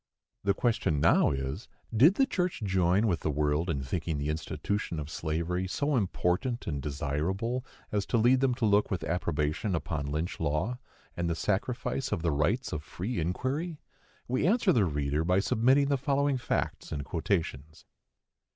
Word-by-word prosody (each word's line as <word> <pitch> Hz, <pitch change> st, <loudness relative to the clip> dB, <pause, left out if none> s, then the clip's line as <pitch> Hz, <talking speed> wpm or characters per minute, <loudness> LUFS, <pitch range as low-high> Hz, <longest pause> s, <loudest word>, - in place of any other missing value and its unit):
The 100 Hz, 0 st, +2 dB
question 110 Hz, -, +1 dB
now -, -, +5 dB
is, 65 Hz, -1 st, -3 dB, 0.3 s
Did 150 Hz, -, +6 dB
the 270 Hz, -, +4 dB
church 180 Hz, -, -1 dB
join 95 Hz, +1 st, +2 dB
with 90 Hz, -7 st, +1 dB
the -, -, -2 dB
world 75 Hz, +3 st, 0 dB
in 70 Hz, -4 st, -1 dB
thinking 80 Hz, +3 st, -2 dB
the 70 Hz, +1 st, -2 dB
institution 85 Hz, +3 st, -2 dB
of 75 Hz, 0 st, -6 dB
slavery 85 Hz, +4 st, -2 dB
so 145 Hz, +8 st, 0 dB
important 105 Hz, +3 st, 0 dB
and 70 Hz, -3 st, -3 dB
desirable 80 Hz, -, -2 dB, 0.3 s
as 105 Hz, -1 st, -1 dB
to 120 Hz, -, +1 dB
lead 120 Hz, +3 st, +5 dB
them 130 Hz, -2 st, +2 dB
to 120 Hz, -2 st, 0 dB
look 105 Hz, 0 st, +3 dB
with 90 Hz, -4 st, -2 dB
approbation 80 Hz, +2 st, -1 dB
upon 75 Hz, -3 st, -3 dB
Lynch 80 Hz, +4 st, -3 dB
law, 80 Hz, +11 st, -1 dB, 0.4 s
and 85 Hz, -1 st, -1 dB
the 85 Hz, -, 0 dB
sacrifice 120 Hz, +8 st, -1 dB
of 100 Hz, -6 st, -1 dB
the 85 Hz, -, +2 dB
rights 75 Hz, -, 0 dB
of 75 Hz, -, -2 dB
free 95 Hz, +7 st, -4 dB
inquiry? 135 Hz, -, -2 dB, 0.5 s
We 130 Hz, +6 st, +1 dB
answer 210 Hz, -2 st, +4 dB
the 110 Hz, -8 st, +4 dB
reader 75 Hz, -1 st, 0 dB
by 90 Hz, +3 st, +3 dB
submitting 130 Hz, +8 st, +3 dB
the 140 Hz, -, +3 dB
following 140 Hz, -1 st, +1 dB
facts -, -, -2 dB
and 70 Hz, -3 st, -3 dB
quotations. 80 Hz, -3 st, -2 dB
90 Hz, 170 wpm, -29 LUFS, 75-120 Hz, 0.5 s, Did